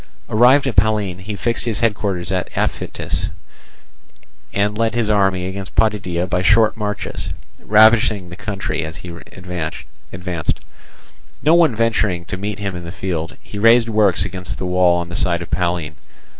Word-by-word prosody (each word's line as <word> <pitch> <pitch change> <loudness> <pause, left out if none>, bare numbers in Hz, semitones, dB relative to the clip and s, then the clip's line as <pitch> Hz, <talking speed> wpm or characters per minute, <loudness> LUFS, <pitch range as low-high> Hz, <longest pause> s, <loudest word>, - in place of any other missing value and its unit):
Arrived 125 +6 +5
at 130 -5 -2
Pallene, 105 -3 +2
he 100 +3 -6
fixed 115 +3 -2
his 110 -3 -2
headquarters 100 -5 0
at 95 -1 -1
Aphytis, - - -2 1.2
and 105 +1 0
led 115 +1 0
his 115 -3 +1
army 95 -3 +2
against 95 -1 -6
Potidæa 95 -5 +1
by 90 0 0
short 110 +4 +4
marches, 105 -2 -4 0.3
ravaging 110 -3 +4
the 90 - -8
country 105 -1 -3
as 80 0 -6
he - - -7
advanced. 90 0 -6 0.8
No 155 - +5
one 165 -8 +4
venturing 105 -6 0
to - - -4
meet 100 +1 -4
him 100 -3 -4
in 85 - -6
the 85 - -7
field, 85 -4 -4
he 105 - -8
raised 115 +2 +5
works 100 -5 +3
against 95 -2 -5
the - - -4
wall 90 -1 +3
on 85 0 -4
the 85 - -6
side 85 -1 0
of - - -13
Pallene. 85 -4 -1
100 Hz, 160 wpm, -19 LUFS, 90-110 Hz, 1.2 s, Arrived